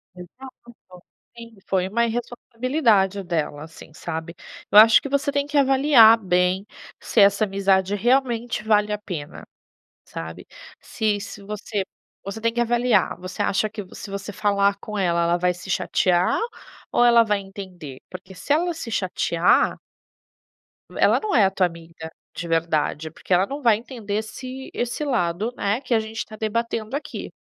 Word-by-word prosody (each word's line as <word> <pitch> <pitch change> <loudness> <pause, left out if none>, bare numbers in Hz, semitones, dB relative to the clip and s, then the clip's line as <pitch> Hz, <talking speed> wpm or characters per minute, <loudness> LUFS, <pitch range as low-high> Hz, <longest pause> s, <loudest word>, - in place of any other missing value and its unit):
Exato, 185 -1 -14 0.3
sim, 230 -2 -12
foi 185 -1 0
uma 235 +4 +1
irresponsabilidade 230 -3 0
dela, 155 -4 -3
assim, 160 -1 -13
sabe. 160 +2 -6 0.4
Eu - - +5
acho 220 0 +8
que - - -5
você 280 +1 0
tem 285 0 0
que 290 0 -2
avaliar 265 -4 +6
bem 180 -1 0 0.3
se - - -1
essa 200 +1 +5
amizade 195 0 +1
realmente 240 -1 0
vale 210 -1 +2
a 210 - -1
pena, 175 -8 -7 0.6
sabe, 80 0 -8 0.3
se 210 -2 -1
se 200 0 -9
você 210 0 -4 0.4
você 200 +2 -6
tem 230 +1 0
que 240 - -1
avaliar. 240 -5 +2
Você 185 +1 -5
acha 205 +2 +1
que 215 -1 -6
se 200 - -9
você 200 +1 -5
falar 200 0 +1
com 210 0 -6
ela, 170 -2 +1
ela 170 +1 +2
vai 180 0 +1
se 180 +2 -10
chatear 180 0 +1 0.5
ou - - +3
ela 235 -1 +6
vai 210 -1 0
entender, 185 -8 -10
porque 185 +1 -10
se 285 - -2
ela 340 +3 +1
se 255 -7 -7
chatear 180 -4 +1 1.2
Ela - - +4
não 430 -9 -2
é 205 -4 +5
tua 185 -1 +2
amiga 165 -1 -11 0.2
de 170 - -5
verdade, 160 -1 -1
porque - - -15
ela 185 +2 +4
não 280 +4 -6
vai 230 -4 +4
entender 225 -3 -6
esse 255 +5 -6
esse 240 +5 -3
lado, 215 -3 -1
né, 205 +3 -1
que 255 - -2
a 225 - +4
gente 220 +1 -5
tá 215 - -11
debatendo 225 +2 -3
aqui. 295 0 -6
210 Hz, 160 wpm, -23 LUFS, 180-235 Hz, 1.2 s, acho